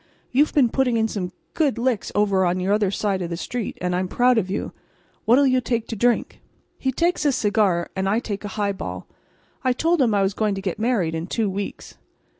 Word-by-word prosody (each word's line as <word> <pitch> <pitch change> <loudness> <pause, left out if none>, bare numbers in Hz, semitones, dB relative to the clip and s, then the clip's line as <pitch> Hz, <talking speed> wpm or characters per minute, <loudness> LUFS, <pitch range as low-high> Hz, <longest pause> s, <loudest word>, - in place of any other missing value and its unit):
You've 290 +4 +3
been 265 -5 +5
putting 250 -1 +1
in 220 0 +2
some 185 -5 -4 0.2
good 290 -7 +1
licks 235 -3 -1
over 200 -2 +3
on 180 0 +1
your 200 +2 +1
side 195 -1 -1
of 170 - -3
the 170 - -3
street, 235 +5 -4
and 180 0 0
I'm 185 +1 0
proud 245 +3 +3
of 190 -3 -3
you. 195 - -3 0.5
What'll 250 +5 +5
you 255 -1 +3
take 230 -1 -1
to 225 - -3
drink?" 240 +3 0 0.4
He 265 - 0
takes 340 +5 0
a 290 - +3
cigar, 205 -7 +1
and 190 0 0
I 210 - +2
take 210 -4 -4
a - - -3
highball. 200 -2 -3 0.6
I 255 -1 +3
told 330 +4 +1
him 230 -5 +3
I 200 - +3
was 195 +1 0
going 210 -1 0
to - - -4
get 190 0 -3
married 215 -8 +1
in 165 +1 -3
two 215 -1 -1
weeks. 200 +1 -6
215 Hz, 220 wpm, -23 LUFS, 190-245 Hz, 0.6 s, been